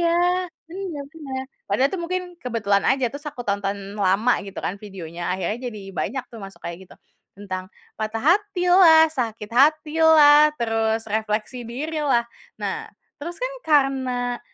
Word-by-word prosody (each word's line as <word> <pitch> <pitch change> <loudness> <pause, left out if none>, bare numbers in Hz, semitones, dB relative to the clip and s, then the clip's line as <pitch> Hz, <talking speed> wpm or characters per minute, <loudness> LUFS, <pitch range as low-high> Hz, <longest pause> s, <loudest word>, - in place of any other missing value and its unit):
iya, 340 0 +2 0.6
benar 350 -6 -5
benar. 270 -5 -5 0.3
Padahal 235 +8 +3
itu 380 - -2
mungkin 365 +2 -2 0.2
kebetulan 215 -5 +1
aja, 265 -1 +2
terus 290 +1 -9
aku 250 -4 -7
tonton 200 0 -1 0.2
lama 200 +5 +3
gitu 195 - -10
kan 195 - -3
videonya, 175 -3 -5
akhirnya 190 +5 -2
jadi 215 -3 -8
banyak 255 +7 -2
tuh 230 - -9
masuk 195 0 -11
kayak 175 +2 -7
gitu. - - -15 0.4
Tentang 185 -2 -6 0.3
patah 220 +1 -3 0.2
hatilah, 355 -5 +5
sakit 225 -6 -3
hatilah, 305 +2 +6
terus 225 -1 0
refleksi 220 +3 -3
dirilah. 285 -2 0 0.3
Nah, - - -4 0.3
terus 340 +3 -6
kan - - -3 0.2
karena 260 -4 +1
245 Hz, 140 wpm, -23 LUFS, 210-305 Hz, 0.6 s, hatilah